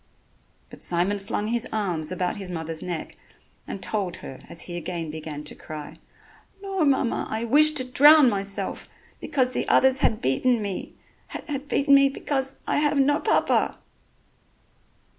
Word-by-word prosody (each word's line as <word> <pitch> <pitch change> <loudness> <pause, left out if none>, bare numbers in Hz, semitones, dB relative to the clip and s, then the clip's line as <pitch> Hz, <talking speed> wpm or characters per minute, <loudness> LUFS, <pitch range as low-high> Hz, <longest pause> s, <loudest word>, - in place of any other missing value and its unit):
But - - -13
Simon 180 +4 0
flung 205 +1 -3
his 235 0 0
arms 180 -8 -1
about 180 +2 -2
his 195 -2 -7
mother's 160 -2 -4
neck 175 -3 -5 0.5
and 195 - -7
told 195 -5 -2
her, 130 - -9
as 170 - -1
he 175 - -6
again 170 -2 -4
began 155 -1 -7
to 150 - -7
cry: 150 -1 -9 0.6
"No, 390 -3 -2
mamma, 270 -4 +1
I 220 +1 -3
wished 300 +6 +5
to 260 - +5
drown 290 +3 +6
myself, 200 -3 -2 0.3
because 260 -5 0
the - - -2
others 265 0 +4
had 220 - +1
beaten 225 - +1
me... 200 -3 -5 0.3
had 285 -2 -6
beaten 280 0 +2
me... 275 0 +6
because 270 -1 -3
I - - 0
have 295 0 +1
no 290 +2 +3
Papa." - - +1
220 Hz, 155 wpm, -24 LUFS, 175-275 Hz, 0.6 s, drown